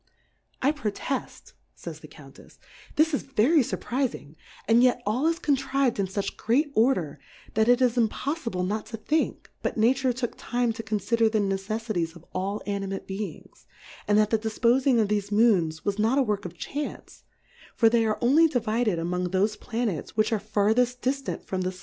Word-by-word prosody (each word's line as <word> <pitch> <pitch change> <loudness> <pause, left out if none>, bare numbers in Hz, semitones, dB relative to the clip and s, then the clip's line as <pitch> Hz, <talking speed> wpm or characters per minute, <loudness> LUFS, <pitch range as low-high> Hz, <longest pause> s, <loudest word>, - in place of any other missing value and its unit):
I 280 - +4
proteft, 270 -1 -4 0.2
fays - - -8
the - - -12
Countefs^ - - -16 0.4
this 315 +1 +3
is 285 - +1
ve 240 -5 +1
ry 330 - +6
furprizing, 250 - -2 0.3
and 230 +1 +5
yet 250 -1 +4
all 245 +9 +1
is 330 0 +1
contrived 270 -5 0
in 195 - +1
fuch 195 +1 -3
great 280 +7 +1
Order, 185 - +1 0.3
that 220 +2 +2
it 245 +1 +5
is 245 -1 +2
impojlfible 230 - -1
not 210 +3 -3
to 225 - -6
think, 305 +8 -1
but - - -2
Nature 255 +4 +3
took 240 -1 -4
lime 245 -1 +1
to 225 - -6
confider 225 +1 +1
the 220 - +1
Neceffities 195 -3 -2
of 170 0 -14
all 195 +3 -3
Animate 195 -1 -3
Beings, 195 +2 -7 0.4
and 205 - +4
that 215 0 +3
the 225 - +3
difpofing 235 +3 +2
of 215 -2 +2
thefe 205 -1 -1
Moons 195 -8 +2
was 205 0 -1
not 225 +5 +2
a 275 - +4
work 210 -5 -2
of 175 -1 -8
Chance; 290 - -6 0.5
for 230 - +4
they 230 0 +3
are 215 -1 0
only 290 +7 +5
divided 230 - 0
among 180 +2 -2
thofe 200 +4 0
Pla 240 +1 -3
nets 190 -2 -4
which 215 +1 +2
are 220 - +1
farthefl 215 +4 +1
dillant 270 +2 -2
from 190 -1 -3
the. 185 0 -3
225 Hz, 180 wpm, -26 LUFS, 200-250 Hz, 0.5 s, ry